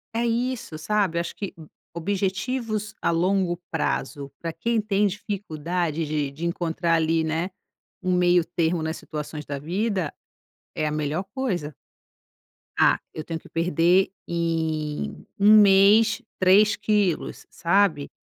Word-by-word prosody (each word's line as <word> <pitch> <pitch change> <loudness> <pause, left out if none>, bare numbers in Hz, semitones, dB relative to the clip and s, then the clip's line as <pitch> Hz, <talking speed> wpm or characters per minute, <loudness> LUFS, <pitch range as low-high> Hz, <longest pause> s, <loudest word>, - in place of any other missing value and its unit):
É 230 - +1
isso, 235 -7 -2
sabe. 195 +1 0
Acho 170 0 -3
que, 200 - -5
hum, 160 - -12 0.3
objetivos 205 +5 -2
a - - +1
longo 175 +1 +1
prazo 145 -3 -2
pra 165 -1 -4
quem 230 +8 0
tem 205 -1 +2
dificuldade 175 -5 -3
de 150 -2 -1
de 150 +5 -6
encontrar 170 0 -1
ali, 165 0 +2
né, 160 +3 -1 0.5
um 185 0 +1
meio 175 -1 +4
termo 165 -1 0
nas 160 +1 -2
situações 150 0 -6
da 145 - -4
vida, 185 +2 -1 0.6
é - - -1
a - - -1
melhor 150 +3 -1
coisa. 185 - -2 1.0
"Ah, - - +4
eu 155 - -5
tenho 165 0 -5
que - - -17
perder 170 +3 +3 0.2
em 160 - -2
1 210 +2 +8
mês 205 +3 +5 0.2
3 195 +3 +5
quilos", 210 -5 0
sabe? 170 -4 +1
175 Hz, 135 wpm, -24 LUFS, 160-200 Hz, 1.0 s, 1